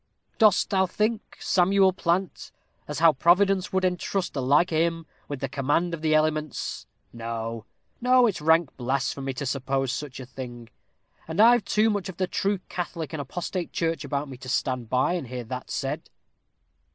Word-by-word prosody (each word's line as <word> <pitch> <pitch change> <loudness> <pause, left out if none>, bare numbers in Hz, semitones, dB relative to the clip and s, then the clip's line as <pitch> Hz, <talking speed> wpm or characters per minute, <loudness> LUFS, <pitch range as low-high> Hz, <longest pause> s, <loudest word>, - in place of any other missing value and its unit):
"Dost 215 -4 +4
thou 190 -1 +3
think, 215 +4 -2
Samuel 190 +1 +3
Plant, 180 +1 -1 0.4
as 150 - -4
how 165 0 +6
Providence 185 +6 +3
would 190 -1 +1
entrust 180 +1 -1
the 135 - -2
like 145 +7 +3
o' - - +1
him 165 0 +1 0.2
with 145 -3 -5
the 135 - -1
command 145 +6 0
of 165 - -4
the 155 -1 +2
elements? 155 0 -1 0.3
No 115 -1 -5 0.4
no, 250 0 +5
it's 200 -9 -1
rank 160 0 +3
blasphemy 135 +1 -2
to 140 +2 -4
suppose 135 0 -1
such 140 -2 -5
a 130 - -7
thing, 120 -2 -9 0.6
and 160 +4 -4
I've 235 +1 +7
too 215 +1 +3
much 205 -2 -2
of 180 - -8
the 185 - +1
true 200 +2 0
Catholic 170 -4 -5
and 155 - -3
apostate 175 +5 -4
church 165 -1 -1
about 145 0 -2
me, 130 -2 -9
to 130 +1 -9
stand 125 -3 -1
by 130 +8 +2
and 170 -8 -3
hear 125 0 -5
that 125 +3 -6
said." - - -3
160 Hz, 175 wpm, -26 LUFS, 135-185 Hz, 0.6 s, I've